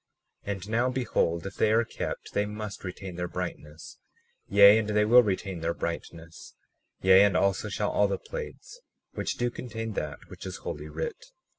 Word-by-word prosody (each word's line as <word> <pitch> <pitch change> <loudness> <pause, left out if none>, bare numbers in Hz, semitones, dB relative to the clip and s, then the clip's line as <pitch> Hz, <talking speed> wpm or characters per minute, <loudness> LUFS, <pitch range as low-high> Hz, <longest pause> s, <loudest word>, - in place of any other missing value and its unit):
37:5 - - 0
And 100 0 -6
now 120 +3 +2
behold, 110 -9 0
if 95 - -6
they 105 - +3
are 115 +1 +3
kept - - -5
they 105 0 +1
must 105 -1 -6
retain 95 -1 -7
their 90 0 -2
brightness; 85 -4 -7 0.5
yea, 100 +2 +8
and 110 - -2
they 105 0 +3
will 120 +3 +8
retain 95 -4 -2
their 85 +1 -2
brightness; 85 -1 -6 0.5
yea, 95 +1 +8
and 100 -2 +3
also 100 +2 +1
shall 105 +1 -1
all 105 - +3
the 100 - -1
plates - - -8 0.3
which - - -3
do 120 0 0
contain 115 -2 -5
that 75 -6 -3
which - - -9
is - - -6
holy 75 +1 -6
writ. 80 +2 -5
100 Hz, 180 wpm, -28 LUFS, 90-110 Hz, 0.5 s, yea